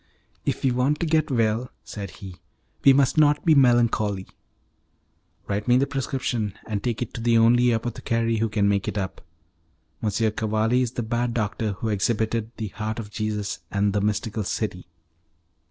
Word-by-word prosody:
"If - - -1
we 135 - +3
want 130 +5 +1
to - - +1
get 155 -1 +2
well," 115 -1 +1
said 100 -2 -7
he, 95 -1 -10 0.5
"we 135 - +8
must 140 +2 +3
not 150 -1 +4
be 160 - +6
melancholy." 115 -7 +3 1.2
"Write 100 +1 -2
me 125 0 +5
the 135 - +3
prescription, 125 -6 -2
and 105 -2 -3
take 120 -1 -1
it 120 - -10
to 115 - -5
the 115 0 +3
only 120 +2 +5
apothecary 115 0 -1
who 115 +1 0
can 105 -1 +1
make 100 -1 +1
it - - -3
up. 95 -2 -4 0.8
M. 110 - 0 0.2
Cavalli 110 +3 +1
is 125 -1 -1
the 120 - -2
bad 120 +1 -1
doctor 105 -1 -1
who 110 +3 -4
exhibited 110 +2 0
'The 110 -2 -4
Heart 110 +2 -4
of 105 -3 -6
Jesus,' 105 -1 -3
and 100 0 +1
'The 105 - +1
Mystical 105 +1 -1
City. 95 -3 -3
115 Hz, 170 wpm, -24 LUFS, 105-125 Hz, 1.2 s, we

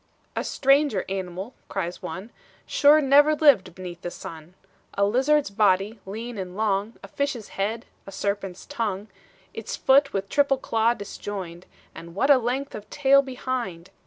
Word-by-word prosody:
"A - - -1
stranger 275 -6 +2
animal," 190 +4 -5 0.2
cries 180 -3 -4
one, 190 +4 -7 0.3
"Sure 295 +1 +5
never 290 +2 +5
lived 280 - +4
beneath 180 -2 -8
the 175 - -4
sun. 170 -1 -10 0.4
A 200 - +3
lizard's 270 +5 +2
body, 205 +1 +2
lean 225 +2 -6
and 185 0 -6
long, 210 +1 0
A - - -8
fish's 275 -6 -3
head, 215 +4 -3 0.2
a - - -8
serpent's 195 -1 -3
tongue, 215 -6 -3 0.4
Its 225 - -5
foot 275 +1 +4
with 195 0 -2
triple 280 +3 +2
claw 230 -2 +1
disjoined; 190 -4 -7 0.3
And 170 +1 -11
what 275 +8 +3
a 270 - +7
length 255 +4 -2
of 210 0 -9
tail 275 -1 +4
behind! 245 -9 -5
215 Hz, 155 wpm, -25 LUFS, 190-265 Hz, 0.4 s, a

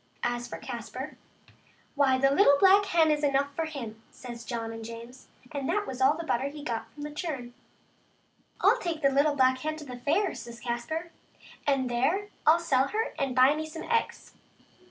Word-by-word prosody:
As 240 0 -1
for - - -6
Caspar, 245 +3 -6 0.8
"why, 275 -3 +3
the 275 +1 +3
little 285 -2 +6
black 390 +4 +6
hen 325 -4 +3
is 300 0 0
enough 280 0 +1
for 325 - -1
him," 235 -8 -7
says 240 -2 -9
John 230 -2 -4
and 225 0 -7
James, 230 +3 -10 0.2
and 280 -3 -3
that 415 0 +1
was 260 0 -6
all 280 +4 +4
the 335 - -4
butter 265 -3 0
he 290 +1 -8
got 225 -4 -4
from 290 +5 -10
that 295 0 -6
churn. 270 -8 -4 0.6
" - - -27
I'll - - +5
take 325 -4 -3
the 275 - +5
little 285 +2 +3
black 260 -1 +3
hen 310 +3 -2
to 310 -1 -9
the 250 -2 -7
fair," 330 +11 +1
says 235 +1 -9
Caspar, 315 +8 -3 0.3
" - - -20
and 275 -2 +2
there 290 +13 0 0.2
ril 315 +2 +8
sell 275 -6 +2
her 445 +6 -2
and 270 -3 -1
buy 260 +2 +6
me 315 +1 -4
some 320 +1 -7
eggs. 465 -1 -1
275 Hz, 200 wpm, -28 LUFS, 245-315 Hz, 0.8 s, ril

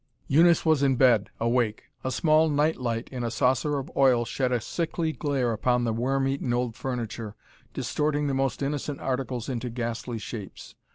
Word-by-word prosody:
Eunice 170 +4 +5
was 155 -3 +3
in 135 -2 +3
bed, 120 -5 +4
awake. 115 -2 0 0.2
A 130 - -1
small 155 +3 +3
nightlight 130 -6 0
in 125 -2 -4
a 120 - -1
saucer 130 +5 +1
of 135 - -5
oil 125 -3 +4
shed 130 +1 -1
a 125 - +2
sickly 165 +5 -2
glare 135 -6 0
upon 125 +3 +1
the 115 -2 0
worm 135 +4 0
eaten 135 -2 -1
old 120 -2 -1
furniture, 115 -5 -4 0.4
distorting 150 0 0
the 140 - 0
most 135 +1 -1
innocent 145 0 -3
articles 130 -3 -3
into 125 -1 -3
ghastly 120 0 -4
shapes. 105 -2 -8
130 Hz, 170 wpm, -26 LUFS, 120-140 Hz, 0.4 s, Eunice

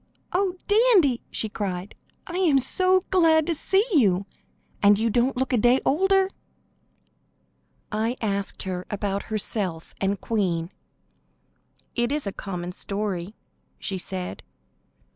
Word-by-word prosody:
"Oh, 370 0 +1
Dandy!" 410 - +4
she 220 - -1
cried. 195 -3 -4 0.3
"I 350 - -5
am 335 -7 +4 0.5
glad 325 -4 +4
to 335 - 0
see 385 +6 +2
you, 200 - +3 0.6
and 205 0 +6
you 225 +1 +1
don't 250 +3 +1
look 260 0 -1
a - - +4
day 245 +4 +4
older!" 385 +5 +3 1.6
I 225 +4 -1
asked 200 -2 -2
her 185 -1 -4
about 200 -1 -2
herself 200 -6 -1
and 195 0 0
Queen. 180 -6 -1 1.2
"It 240 +1 0
is 295 0 -2
a 200 - -2
common 180 -3 -5
story," 200 0 -4 0.4
she 190 -1 -4
said. 180 0 -5
220 Hz, 125 wpm, -25 LUFS, 195-300 Hz, 1.6 s, and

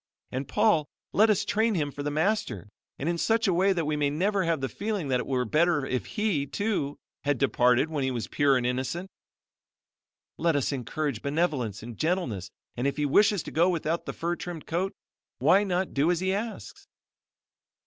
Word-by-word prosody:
And, 130 +1 -3
Paul, 210 -9 +2 0.2
let 220 +2 +5
us 210 - +2
train 220 0 +1
him 145 -4 -1
for 145 - -7
the 145 - -1
Master 150 - -1 0.3
and 140 - -3
in 170 0 0
such 225 +3 +2
a 190 - +3
way 190 +3 +3
that 170 -4 0
we 150 0 0
may 145 -1 +1
never 190 +6 +1
have 165 -2 +1
the 135 - -1
feeling 200 -3 -3
that 125 -1 +2
it - - -4
were 125 -2 0
better 155 +3 +2
if 130 -1 -2
he, 205 -10 0
too, 195 -7 -2 0.3
had 145 -1 +1
departed 125 +1 +3
when 145 -3 -1
he 130 - +1
was 120 -3 -3
pure 140 -2 +3
and 125 - -1
innocent. 130 +9 -2 1.3
Let 165 -1 +2
us 140 -1 +1
encourage 140 -1 -3
benevolence 140 - -1
and 115 -1 -9
gentleness 155 - -1 0.3
and 125 +3 0
if 140 - -2
he 150 - +1
wishes 200 +6 +4
to - - -8
go 170 +3 +3
without 165 -1 -1
the - - -3
fur 170 +1 -2
trimmed 175 -3 -7
coat, 185 +4 -1 0.5
why 195 +3 +4
not 185 -1 -1
do 145 +4 +2
as 175 -2 +2
he 190 +1 0
asks?" 220 +3 -5
155 Hz, 200 wpm, -27 LUFS, 135-190 Hz, 1.3 s, let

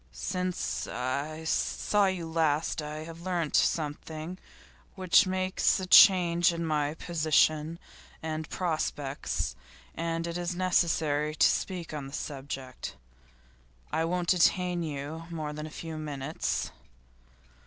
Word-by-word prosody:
'Since 180 - -2
I 140 +5 -3
saw 200 +5 +1
you 185 -3 -2
last 160 -1 +1
I 150 +1 -5
have 165 +1 -10
learnt 175 -4 -1
something 155 +3 -1 0.6
which 185 +2 +5
makes 185 +1 +1
a 190 - -3
change 175 -2 +7
in 170 0 -3
my 150 -1 0
position 155 -1 +2 0.5
and 155 -1 -3
prospects, 145 - -2 0.4
and 165 0 -2
it 170 +1 -3
is 175 0 -2
necessary 160 -4 +1
to - - +6
speak 180 -4 -2
on 145 -3 -4
the 135 - -11
subject. 135 - -6 1.0
I 160 - +1
won't 175 +1 -1
detain 180 0 +3
you 155 +1 -5
more 155 -3 -4
than 150 +1 -5
a - - -8
few 160 0 -6
minutes. 150 -1 -3
160 Hz, 120 wpm, -29 LUFS, 150-175 Hz, 1.0 s, change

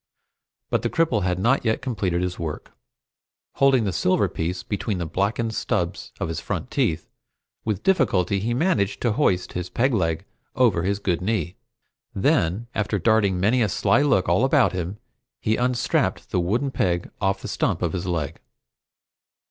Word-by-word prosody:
But - - +2
the - - -1
cripple 165 -11 +1
had 90 -1 0
not 120 +8 +2
yet 110 -2 +1
completed 95 -8 -1
his 90 -1 -3
work. 80 -3 -5 0.9
Holding 135 -3 +4
the 100 -3 -1
silver 95 +4 +2
piece 90 +1 -3
between 105 -1 -2
the 85 - -3
blackened 105 +7 -1
stubs - - -2
of - - -1
his 80 -1 -3
front - - -4
teeth, 80 +1 0 0.6
with 105 -4 -2
difficulty 100 - +2
he 115 +4 -1
managed 125 - +1
to 120 - +2
hoist 95 -7 +1
his 90 0 -4
peg 130 +2 +1
leg 80 -3 0 0.3
over 115 -9 +3
his 100 +3 0
good 90 -4 -1
knee. 100 -2 -1 0.6
Then, 110 - +1
after 105 0 -1
darting 100 -1 +2
many 110 +7 +3
a 110 - +2
sly 115 +8 +2
look 140 -10 +2
all 85 +8 +3
about 135 0 +4
him, 90 +2 -3 0.4
he 110 - +1
unstrapped 125 0 0
the - - +1
wooden 115 +11 0
peg 85 -7 -1
off 95 -1 0
the - - -4
stump - - -1
of 85 - 0
his 90 0 -3
leg. 80 -3 -3
100 Hz, 170 wpm, -24 LUFS, 90-120 Hz, 0.9 s, Holding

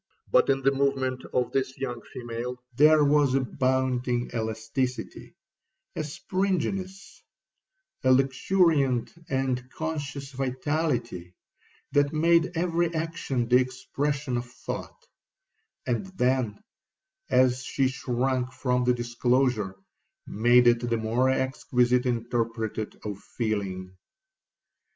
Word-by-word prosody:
But - - +4
in 135 0 +2
the 135 - +4
movement 135 -2 0
of 125 -1 0
this 130 -1 -1
young 125 -3 -4
female, 120 +1 -6 0.2
there 150 +2 +6
was 145 -2 +3
a - - +4
bounding 130 -1 0
elasticity, 110 +3 -3 0.6
a 155 - -2
springiness, 190 +4 -3 0.8
a 130 - +4
luxuriant 135 0 +2 0.2
and 130 -2 -1
conscious 145 -3 -5
vitality, 130 - -2 0.6
that 145 +1 +2
made 170 +2 +3
every 170 0 +1
action 155 -7 -2
the 125 +1 +6
expression 135 +1 -1
of 120 0 -5
thought; 465 - -7 0.8
and 125 +8 -1
then, 125 -5 0 0.7
as 130 0 +3
she 135 +1 +1
shrunk 130 0 -1
from 125 -1 0
the 125 0 +3
disclosure, 120 -3 0 0.5
made 120 +3 +4
it 120 0 +5
the 120 -1 -1
more 115 +4 +1
exquisite 125 -1 +1
interpreter 115 -2 -2
of 105 -2 -5
feeling. 100 -5 -3
130 Hz, 105 wpm, -27 LUFS, 120-140 Hz, 0.8 s, there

